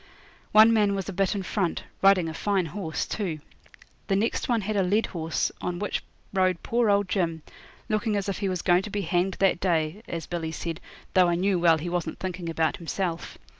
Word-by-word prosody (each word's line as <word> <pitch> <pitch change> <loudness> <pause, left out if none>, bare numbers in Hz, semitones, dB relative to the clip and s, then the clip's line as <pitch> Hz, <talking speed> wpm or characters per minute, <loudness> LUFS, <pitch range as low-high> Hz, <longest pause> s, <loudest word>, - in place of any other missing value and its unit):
One 220 +2 +7
man 205 -2 +3
was 195 -2 -3
a 200 - -4
bit 195 +2 +1
in 195 - -2
front 185 -2 -1 0.2
riding 195 -3 +5
a 160 - -4
fine 195 +1 0
horse, 160 0 -3
too. 185 -7 -3 0.7
The 195 - +2
next 220 +6 0
one 235 -2 +2
had 210 +2 -2
a 200 - +3
led 200 +5 +2
horse, 165 -2 -2
on 180 -1 -2
which 205 +3 -2 0.3
rode 185 -2 +1
poor 235 -1 +1
old 200 -1 +3
Jim, 170 -4 -1 0.4
looking 215 0 0
as 200 -1 -1
if 195 - -2
he 200 -2 0
was 180 -3 -2
going 175 0 +4
to 210 - -7
be 205 0 -2
hanged 180 +2 0
that 195 -3 +2
day, 170 +1 0
as 165 -1 -4
Billy 165 -2 -3
said, 165 0 -5 0.3
though 185 -1 +5
I 175 - +2
knew 185 +1 +1
well 165 -1 +5
he 160 +3 -5
wasn't 175 -1 -2
thinking 185 -2 -4
about 160 -1 0
himself. 170 0 -3
185 Hz, 210 wpm, -26 LUFS, 170-200 Hz, 0.7 s, One